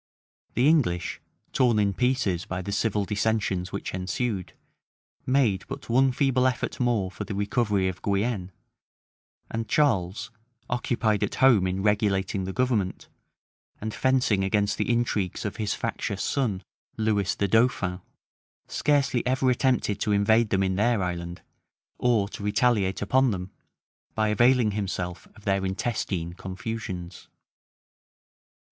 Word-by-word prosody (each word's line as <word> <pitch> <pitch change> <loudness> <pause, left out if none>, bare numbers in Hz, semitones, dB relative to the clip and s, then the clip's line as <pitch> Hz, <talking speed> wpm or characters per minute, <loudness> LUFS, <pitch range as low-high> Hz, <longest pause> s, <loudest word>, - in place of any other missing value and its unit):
The 125 +3 +3
English, 125 - +1 0.3
torn 120 -4 +3
in 100 -1 +2
pieces 125 -8 0
by 95 0 -4
the 100 - -4
civil 105 0 0
dissensions 100 -2 -1
which - - -5
ensued, 95 +2 -2 0.7
made 125 -8 +2
but 135 -1 -8
one 130 +3 +4
feeble 130 -1 +2
effort 130 -1 -2
more 115 -7 +1
for - - -6
the 100 - -5
recovery 100 -1 +1
of 95 -1 -4
Guienne, 100 -2 -1 1.0
and 115 -1 -3
Charles, 115 -5 +1 0.4
occupied 115 -3 0
at - - -1
home 120 -8 +5
in 95 +1 -2
regulating 100 -2 +1
the 95 - -3
government, 110 -5 -1 0.7
and 110 0 -4
fencing 125 -7 +2
against 100 +1 +1
the - - 0
intrigues 115 -6 -1
of 105 - -4
his 105 -3 -1
factious 100 0 -3
son, 110 -9 -1 0.3
Lewis 105 -4 +1
the 100 - 0
dauphin, 100 -4 +2 0.7
scarcely 140 -4 +1
ever 130 0 +2
attempted 125 -5 +1
to 105 - 0
invade 110 +2 +3
them 95 0 +2
in 95 -1 0
their 110 -1 +2
island, 85 -1 -4 0.6
or 115 -5 +2
to 110 - -8
retaliate 105 -2 +1
upon 130 +5 +3
them, 95 -3 -4 0.6
by 110 -1 +1
availing 120 +1 +4
himself 95 -3 -4
of 110 - -17
their 100 -1 +1
intestine 95 -3 -2
confusions. 95 -2 -6
105 Hz, 135 wpm, -26 LUFS, 95-120 Hz, 1.0 s, home